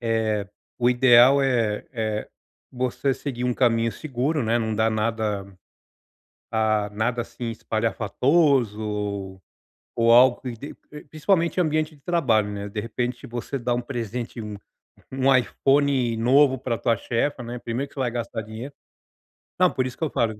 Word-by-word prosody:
eh, 110 -3 0 0.3
o 120 0 +3
ideal, 125 +2 +6
eh 115 -6 0
eh, 110 -2 -3 0.4
você 130 +2 -1
seguir 130 -2 -5
um 125 -1 0
caminho 115 -3 +2
seguro, 140 +2 -2
né, 115 +1 +1
não 110 -1 -1
dar 110 +1 +2
nada, 110 -2 -1 1.1
ah, 110 -2 +1
nada 120 +3 -1
assim 120 - -8
espalhafatoso 110 - 0 0.6
ou 115 0 +4
algo 125 +1 +6
que 125 -2 -4
de 125 +6 -9 0.3
principalmente 170 +3 +1
ambiente 155 -1 0
de 140 - -23
trabalho, 120 -12 +1
né, 100 0 -5
de 105 +1 -4
repente 120 +2 -4
você 120 +3 -5
dá 120 0 -1
um 120 - -1
presente, 120 -1 -5
um 105 -1 -6 0.5
um 135 0 +2
iPhone 135 -1 +2
novo 130 +4 +4
pra 120 -2 -2
tua 115 -3 +1
chefa, 125 +5 -2
né, 120 +1 -6
primeiro 120 +4 -4
que - - -22
você 140 - -5
vai 125 -2 0
gastar 115 -2 -4
dinheiro 110 +6 -8 0.9
não, 180 -1 +5
por 130 - -1
isso 125 - -9
que - - -5
eu 155 - 0
falo 110 -2 -1
120 Hz, 155 wpm, -24 LUFS, 110-135 Hz, 1.1 s, ideal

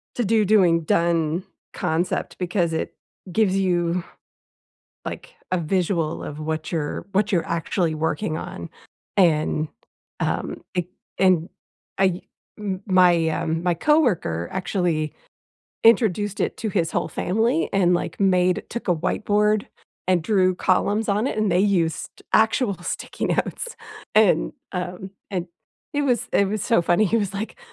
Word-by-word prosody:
"to 240 - 0
do, 220 +1 +3
doing, 185 -5 +4
done" 170 +1 +1 0.3
concept 165 +3 -1
because 175 -2 0
it 160 - -3 0.4
gives 200 -1 +2
you, 175 -2 +1 1.0
like, - - -7 0.2
a 185 - +1
visual 170 -1 0
of 150 - -7
what 155 0 -3
you're 155 -1 -2
what 205 +2 +1
you're 175 -3 +1
actually 170 0 -1
working 155 0 -1
on. 85 -1 -7 0.5
And, 155 -3 +2 0.5
um, - - -2
it 180 -1 0 0.3
and 185 -3 +3 0.5
I 185 -2 +2 0.4
m 195 -2 -4
my, 180 -3 +4
um, 165 +1 -2 0.2
coworker 215 - +2
actually 175 -5 -1 0.7
introduced 210 -3 +3
it - - 0
to 220 - -2
his 170 -5 0
whole - - 0
family 230 - 0
and, 180 -3 +3
like, 175 - -3
made 185 -2 +3
took 235 - -5
a 180 - +4
whiteboard 210 +5 +1 0.4
and 180 -3 +3
drew 185 -1 +2
columns 205 +4 +1
on 210 +4 +1
it, 215 - -2
and 215 -2 +2
they 180 - +3
used 175 -6 0
actual 220 -1 +3
sticky - - -4
notes, 480 - -2 0.4
and, 215 -3 +4 0.2
um, 180 +1 -4 0.2
and 185 -3 -2 0.5
it 290 - +1
was 250 -5 +1
it 200 - +4
was 210 -1 -2
so 230 -7 +3
funny. 175 +5 +3
He 215 - +1
was 200 -4 -1
like, 215 - -5
185 Hz, 140 wpm, -23 LUFS, 170-210 Hz, 1.0 s, doing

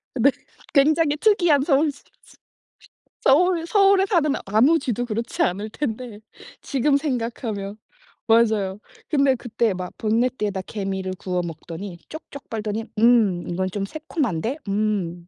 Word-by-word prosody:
네. 270 +3 +4 0.4
굉장히 300 +1 +4
특이한 350 -8 +3
서울쥐 285 -1 +1 0.2
쥐, - - -20 0.8
서울 335 +4 +3
서울에 395 0 +4
사는 330 -8 +2
아무 245 +12 +4
쥐도 245 -2 -2
그렇지 230 0 -3
않을 200 +4 -1
텐데 230 -3 -5 0.4
지금 280 +1 +1
생각하면. 230 -7 -3 0.5
맞아요. 220 -4 +3 0.3
근데 275 -3 +3
그때 230 -3 -1
막 180 -1 -5
본네트에다 215 -3 0
개미를 195 -2 -4
구워 180 -1 -2
먹더니 170 +3 -7
쪽쪽 300 -3 -10
빨더니 220 0 -3
"음 220 -7 +4
이건 185 +2 -1
좀 195 +1 -3
새콤한데? 270 - -3
음 195 -4 -1
230 Hz, 275 characters per minute, -23 LUFS, 200-285 Hz, 0.8 s, 네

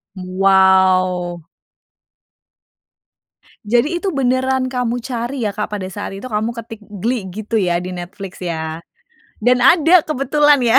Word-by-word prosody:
Wow. 185 -1 +2 2.2
Jadi 245 +11 +1
itu 395 - -1
beneran 260 -2 0
kamu 245 -1 -1
cari 240 0 -3
ya 205 - -1
Kak 210 +1 -3
pada 205 -3 -4
saat 195 +1 -6
itu 200 - -9
kamu 220 -2 -1
ketik 225 -1 -8
"Glee" 210 0 -3
gitu 215 +3 -2
ya 175 -2 +1
di 180 +1 -5
Netflix 180 +2 -8
ya 160 -2 -4 0.6
dan 250 +2 +4
ada 320 +6 +5
kebetulan 295 -1 +3
ya. 240 +2 +5
215 Hz, 130 wpm, -18 LUFS, 185-255 Hz, 2.2 s, ada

